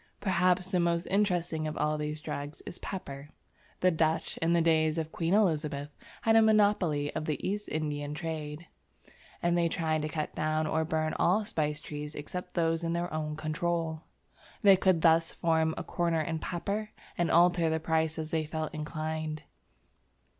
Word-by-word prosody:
Perhaps 185 -1 +2
the 180 - +2
most 170 0 +1
interesting 175 -6 +1
of 155 - -4
all 150 0 +1
these 150 0 -3
drugs 145 0 -6
is - - -7
Pepper. 140 -7 -6 0.5
The 185 - +5
Dutch, 160 0 0
in 165 +1 +1
the 170 - +4
days 160 -1 +3
of 160 -1 -2
Queen 170 +3 +1
Elizabeth, 150 -7 +1 0.3
had 225 0 +4
a 225 - +8
monopoly 205 -9 +3
of 155 - -2
the 155 -2 -1
East 205 +2 -3
Indian 150 -1 -3
trade, 155 -1 -5 0.8
and 175 0 +3
they 170 -1 +3
tried 160 -1 0
to 155 - -2
cut 155 -1 -3
down 155 0 0
or 160 +1 +1
burn 155 0 -1
all 205 +5 +3
spice 150 -7 -1
trees 150 0 -6
except 180 +5 -6
those 165 -1 +1
in 165 0 0
their 170 -1 -2
own 155 -1 -2
control. 160 +1 -2 0.6
They 200 -1 +8
could 185 -3 +2
thus 165 0 +4
form 160 -1 +1
a - - -3
corner 170 -2 0
in 160 +1 -2
pepper, 200 +6 -3 0.3
and 175 -1 0
alter 175 -1 +4
the 160 0 0
price 160 0 0
as 155 -1 -4
they 160 -2 0
felt 155 0 -3
inclined. 155 0 -4
160 Hz, 175 wpm, -30 LUFS, 155-175 Hz, 0.8 s, a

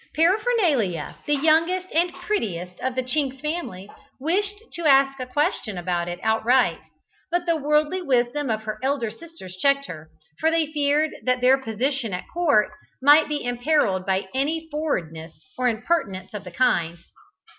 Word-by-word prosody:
Paraphernalia, 325 - +1
the 295 - +3
youngest 325 +5 +2
and 345 +2 +2
prettiest 205 - -3
of 260 -1 -2
the 260 - 0
Chinks 265 0 -2
family, 300 - -4 0.3
wished 395 +8 0 0.2
to 340 - -5
ask 270 -1 +4
a 255 - -4
question 255 - -1
about 175 -1 -2
it 175 0 -5
outright, 230 +3 +2 0.5
but 350 0 0
the 335 -1 +2
worldly 300 +4 +1
wisdom 260 -1 0
of 220 -1 -1
her 215 0 -5
elder 265 -4 -1
sisters 330 - -12
checked 275 +7 +2
her, 155 - -9 0.3
for 320 - +3
they 325 -1 +2
feared 295 +1 +1
that 255 0 +1
their 255 +2 +4
position 245 -1 -2
at 180 - -4
court 290 -12 +3 0.3
might 295 +3 +6
be 295 -1 -2
imperilled 245 -6 +1
by 190 0 -1
any 310 +5 -1
forwardness 170 - -3 0.2
or 250 0 0
impertinence 220 - -1
of 205 -2 -6
the - - -7
kind. 175 -7 +1
270 Hz, 155 wpm, -24 LUFS, 215-315 Hz, 0.5 s, might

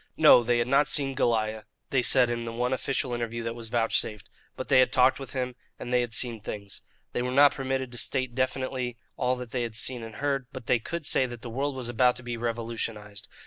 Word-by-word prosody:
No, - - +8
they 120 0 +1
had 120 0 0
not 140 +2 +3
see 140 -2 +3
Goliah, 110 -4 0 0.3
they 135 - +3
said 125 0 +5
in 120 0 -3
the 115 - -5
one 125 +2 -1
official 130 -1 -1
interview 115 -1 -3
that 115 0 -3
was 115 -1 -6
vouchsafed; 115 -3 -1 0.3
but - - -5
they - - +5
had 130 - +4
talked 130 +1 +4
with 135 -2 -8
him, 125 -1 -2 0.2
and 125 - -6
they 125 - +4
had 120 -2 -3
seen 115 -3 -1
things. 100 -2 -7 0.3
They - - -1
were 125 - -2
not 140 +3 +6
permitted 130 -1 -3
to 120 - -4
state 130 -2 0
definitely 130 -1 -2 0.2
all 125 0 0
that 125 -2 -8
they 125 - -1
had 115 -2 -4
seen 125 +1 0
and 115 -1 -9
heard, 140 -3 -1
but 130 -3 -9
they 125 - +2
could 170 +7 -5
say 130 -2 +3
that 120 -2 -9
the 120 - -6
world 140 +3 -2
was 130 -2 -4
about 125 +1 +3
to 120 - -7
be 120 -1 -4
revolutionized. 115 -3 -4
125 Hz, 235 wpm, -27 LUFS, 115-130 Hz, 0.3 s, No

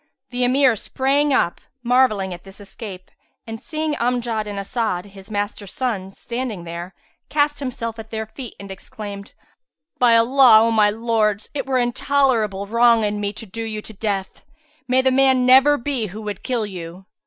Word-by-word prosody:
The 250 0 -1
Emir 255 0 +4
sprang 275 +6 0
up, 175 -10 +1 0.2
marvelling 235 -7 +2
at 175 - -10
this 195 +1 -15
escape 195 -2 -10 0.3
and 225 -1 -7
seeing 310 -1 -3
Amjad 235 -3 -1
and 205 -1 -5
As'ad, 200 -2 -2
his 195 +1 -13
master's 205 -1 -4
sons, 195 -7 -3
standing 235 -6 -4
there, 170 +2 -7 0.3
cast 290 0 +1
himself 235 -4 -4
at 220 0 -9
their 220 0 -4
feet 240 +2 -9
and 200 0 -9
exclaimed, 200 +1 -9 0.7
"By 240 -2 +5
Allah, 235 -1 +6
O 230 - +2
my 215 -2 +4
lords, 215 -1 0
it 285 - -3
were 265 -1 +1
intolerable 240 -5 +1
wrong 230 +1 +4
in 210 0 -1
me 205 -1 -2
to 220 - -9
do 225 +3 -7
you 215 -1 -4
to 220 - -10
death. 195 -2 -3 0.4
May 260 +1 +3
the 260 - +3
man 260 -1 +4
never 270 +3 +6
be 245 -4 -2
who 210 +4 -8
would 205 -2 -5
kill 240 -4 -1
you! 180 -1 -8
225 Hz, 175 wpm, -21 LUFS, 205-255 Hz, 0.7 s, Allah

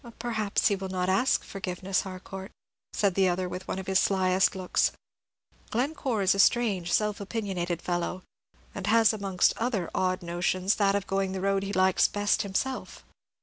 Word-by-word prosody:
"Perhaps 220 -4 0
he 200 - +1
will 190 0 -6
not 185 0 -1
ask 250 +8 +2
forgiveness, 190 -1 -2
Harcourt," 190 +1 -8 0.4
said 200 -3 +1
the 190 0 +3
other, 180 +1 -1
with 180 +1 -7
one - - -3
of 190 - -5
his 190 0 +2
slyest 190 -1 +3
of - - -11
looks. 185 -1 +1 0.8
"Glencore 250 -3 -1
is 190 - +4
a 195 - -3
strange, 195 -6 +3
self 210 +1 +1
opinionated 190 -5 -3
fellow, 175 +1 -2 0.5
and 200 0 -5
has 225 0 +5
amongst 195 -3 +1
other 225 -7 -1
odd 185 0 0
notions 180 +3 0
that 200 -2 +3
of 200 -1 -1
going 195 -1 -1
the 190 - -3
road 195 0 +1
he 195 0 -4
likes 185 -1 +3
best 205 0 +1
himself. 230 +7 -3
195 Hz, 175 wpm, -28 LUFS, 185-205 Hz, 0.8 s, has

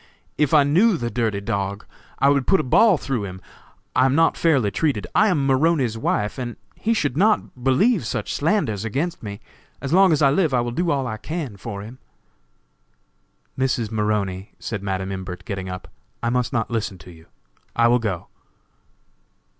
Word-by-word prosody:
If 150 -2 +1
I 150 -2 +6
knew 180 +8 +3
the 120 -4 -3
dirty 110 -4 -1
dog, 100 -1 -3 0.3
I 140 - +4
would 140 -2 +2
put 195 - +4
a - - 0
ball 195 - +5
through 130 -6 -2
him. 95 -1 -7 0.6
I 130 - +5
am 135 - +1
not 165 +1 +4
fairly 135 -11 +2
treated. 130 - 0
I 210 +3 +4
am 155 -9 +1
Maroney's 135 -3 +2
wife, 110 +1 -1
and 120 -2 -4 0.2
he 230 +1 -1
should 145 - 0
not 195 - +1
believe 175 - +3
such - - -3
slanders 145 - 0
against 145 - -2
me. 100 -1 -7 0.4
As 140 +2 -3
long 190 0 +6
as 150 -1 +2
I 140 - +5
live 155 -3 +2
I 120 - +3
will 120 0 -3
do 170 +8 -1
all 140 -4 +1
I 110 -3 -4
can 150 -2 -5
for 100 +1 -7
him." 120 +5 -11 1.6
"Mrs. 125 -4 -1
Maroney," 105 -3 -2
said 110 -4 -5
Madam 95 -1 -3
Imbert, 95 -1 -6
getting 95 -2 -4
up, 90 0 -7 0.4
"I 120 - +1
must 125 -1 0
not 115 -3 -1
listen 110 -4 -2
to 90 +2 -13
you; 80 -1 -17 0.5
I 115 0 +4
will 120 +1 +4
go." 100 -7 -3
125 Hz, 185 wpm, -22 LUFS, 105-150 Hz, 1.6 s, I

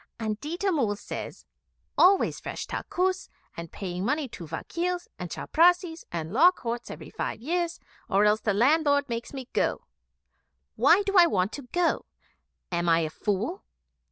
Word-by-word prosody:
And 215 -1 -3
Ditta 345 +6 -1
Mull 235 - +1
says, - - -7 0.5
"Always 380 +2 +4
fresh - - -5
takkus 370 +1 -2 0.3
and 170 -1 -7
paying 180 -2 -5
money 290 +5 0
to 170 -6 -9
vakils 350 - -3
and 180 -1 -5
chaprassis 345 - +2
and 165 +1 -4
law 320 +9 +7
courts 240 -9 -5
every - - -9
five - - -4
years, 340 +6 -2 0.3
or 205 0 +4
else 210 +1 +3
the 210 - +1
landlord 285 +4 +3
makes 235 0 -4
me 265 -3 -7
go. - - 0 0.9
Why 380 +4 +5
do 395 0 +1
I 345 - +8
want 190 - 0
to 275 -4 -9
go? 350 -2 +1 0.6
Am 175 0 0
I 165 0 +4
a 155 -1 -2
fool? 215 - -2
265 Hz, 155 wpm, -27 LUFS, -, 0.9 s, I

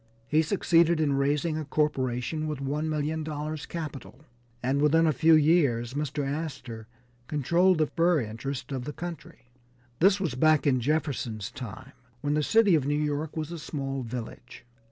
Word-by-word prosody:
He 150 +4 +3
succeeded 170 -1 +3
in 150 -3 +2
raising 145 +3 0
a 155 - -4
corporation 150 0 -1
with 150 -1 -3
$1,000,000 150 +1 -3
capital, 150 -5 -7 0.4
and 135 +3 +1
within 160 +2 +4
a 155 - +3
few 160 +5 +5
years 145 -7 +3
Mr. 145 0 -2
Astor 135 -7 -5 0.4
controlled 170 +5 +2
the 155 - +3
fur 170 +1 +2
interests 125 +5 -5
of 130 -2 -4
the 150 - -5
country. 165 -7 -9 0.5
This 195 +3 +4
was 180 -9 -1
back 155 +4 +3
in 130 -3 +2
Jefferson's 125 -7 -2
time 130 +1 -8 0.3
when 145 0 0
the 150 - +2
city 215 +4 +4
of 145 -4 +2
New 145 - +1
York 150 +1 -2
was 155 +1 -3
a 170 - -6
small 135 -3 -4
village. 125 +1 -8
150 Hz, 155 wpm, -27 LUFS, 135-160 Hz, 0.5 s, few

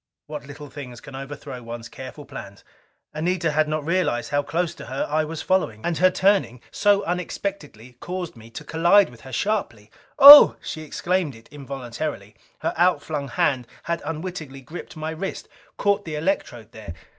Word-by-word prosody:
What 150 -2 -8
little 145 +1 -10
things 125 -5 -9
can 135 - -12
overthrow 135 -2 -8
one's 115 0 -8
careful 135 +4 -10
plans! 100 -5 -10 0.5
Anita 165 +1 0
had 155 +1 +2
not 155 -1 -2
realized 160 -8 0
how 145 0 +2
close 170 +3 -2
to - - -11
her 130 +3 -2
I 155 +1 +1
was 160 +1 -6
following. 180 - 0
And 175 -2 -1
her 185 - +6
turning 190 - +1
so 205 -1 +3
unexpectedly 165 - -5
caused 180 -3 -5
me 115 0 -14
to 115 - -9
collide 170 +2 +4
with 120 - -16
her 130 - -11
sharply. 120 - -2 0.3
"Oh!" 290 +2 +12
She 155 - -6
exclaimed 170 -1 -2
it 115 - -17
involuntarily. 135 -5 -6 0.3
Her - - -1
outflung 160 -5 +1
hand 125 -1 0 0.2
had 170 0 -2
unwittingly 155 -3 -6
gripped 160 +4 -10
my 155 +1 -4
wrist, 180 +5 -5 0.3
caught 200 0 +1
the 160 -2 -5
electrode 135 - -2
there. 105 -6 -9
150 Hz, 170 wpm, -23 LUFS, 125-175 Hz, 0.5 s, Oh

